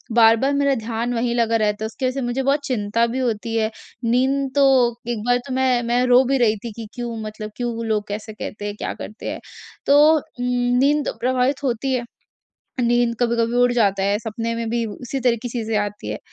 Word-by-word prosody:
बार-बार 230 +4 +5
मेरा 280 0 +2
ध्यान 230 +1 -3
वहीं 235 0 0
लगा 230 -1 +2
रहता 210 -1 0
है - - 0
उसकी 225 +4 -5
वजह 255 - 0
से 270 - -3
मुझे 245 +2 -1
बहुत 275 +2 +2
चिंता 230 -2 +1
भी 245 +3 -3
होती 230 -2 -2
है। 220 -1 +1 0.3
नींद 265 +3 +1
तो 260 -4 +4
एक 225 -3 -2
बार 245 0 +3
तो 265 - -4
मैं 255 -2 +2
मैं 240 +1 +1
रो 250 +1 +6
भी 270 +2 +2
रही 230 -4 +3
थी 235 - -5
कि 230 -2 -7
क्यों 240 -1 -4
मतलब 215 0 -7
क्यों 235 -2 -3
लोग 210 -2 -1
कैसे 215 +1 -6
कहते 210 -1 -7
हैं? 205 0 -4
क्या - - -4
करते 215 - -7
हैं? - - -5 0.5
तो 280 - +5 0.2
उम, 280 -5 -6 0.3
नींद 290 +2 +3
तो - - -2
प्रभावित 255 +3 0
होती 265 +1 -1
है। 245 -2 -1 0.8
नींद 240 0 +2
कभी-कभी 235 0 +1
उड़ 245 0 +4
जाता 200 -5 +2
है 200 +1 +1
सपने 225 +1 -4
में 230 0 -3
भी 235 0 0
उसी 245 +5 -5
तरह 245 -2 +2
की 245 - -3
चीज़ें 225 -2 -2
आती 205 0 -4
हैं। - - -4
235 Hz, 215 wpm, -21 LUFS, 225-255 Hz, 0.8 s, रो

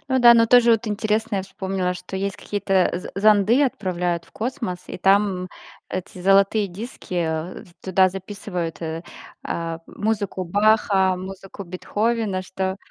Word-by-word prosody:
Ну - - +4
да, 240 -1 +9
но 230 -1 +5
тоже 240 0 +6
вот 225 0 +1
интересно, 215 +1 -1
я - - -1
вспомнила, 190 -1 -3
что 180 +1 -8
есть 195 0 -2
какие-то 195 -2 +1
з 175 - -5
зонды, 215 +5 +5
отправляют 180 -8 -1
в - - -23
космос, 225 -6 -3
и - - -6
там 195 -1 +2 0.4
эти 185 0 -6
золотые 195 +2 +4
диски 180 -4 -4 0.5
туда 190 0 +4
записывают, 185 -3 -5
э, 165 +1 -4 0.4
а, 165 -1 -3
музыку 205 -4 -2
Баха, 200 -1 +3
музыку 195 +1 -8
Бетховена, 205 +2 -1
что 190 +1 -3
195 Hz, 140 wpm, -23 LUFS, 185-215 Hz, 0.5 s, да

